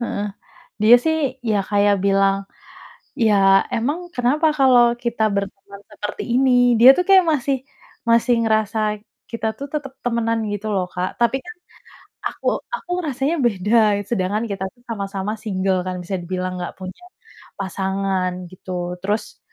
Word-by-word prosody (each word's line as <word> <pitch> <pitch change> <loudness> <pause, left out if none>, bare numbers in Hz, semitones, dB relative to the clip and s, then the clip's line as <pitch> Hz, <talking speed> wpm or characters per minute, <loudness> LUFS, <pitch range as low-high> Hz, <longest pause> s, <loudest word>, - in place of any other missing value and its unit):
Heeh. 210 -3 -3 0.6
Dia 220 +3 +8
sih 305 -5 0
ya 205 -2 +2
kayak 205 0 +3
bilang, 195 0 +3 0.8
"Ya, 195 -4 +4
emang 320 +10 -2
kenapa 255 +6 +1
kalau 245 -3 +5
kita 235 -2 -1
berteman 200 0 -5
seperti 210 -1 -6
ini." 245 -2 +4
Dia 250 +4 +10
tuh 360 - +1
kayak 380 -2 +7
masih 275 -1 0 0.5
masih 235 +1 +4
ngerasa 215 -1 0 0.3
kita 230 -1 -3
tuh 280 - -5
tetep 290 -3 -4
temenan 230 -1 0
gitu 205 +1 -4
loh, 190 -2 0
Kak, 180 +1 -4
tapi 235 +2 +3
kan 355 0 -9 0.8
aku - - -12 0.3
aku 420 - -7 0.2
rasanya 275 +3 -1
beda, 210 0 +2
sedangkan 210 0 0
kita 195 -1 -3
tuh 240 - -28
sama-sama 200 -2 -4
single 190 -3 -1
kan 185 0 -3
bisa 180 +3 -5
dibilang 185 +1 -3
nggak 175 -1 -5
punya 185 - -9 0.5
pasangan 190 -1 -1 0.2
gitu. 180 -1 -5
Terus, 205 +3 -3
215 Hz, 140 wpm, -21 LUFS, 195-245 Hz, 0.8 s, Dia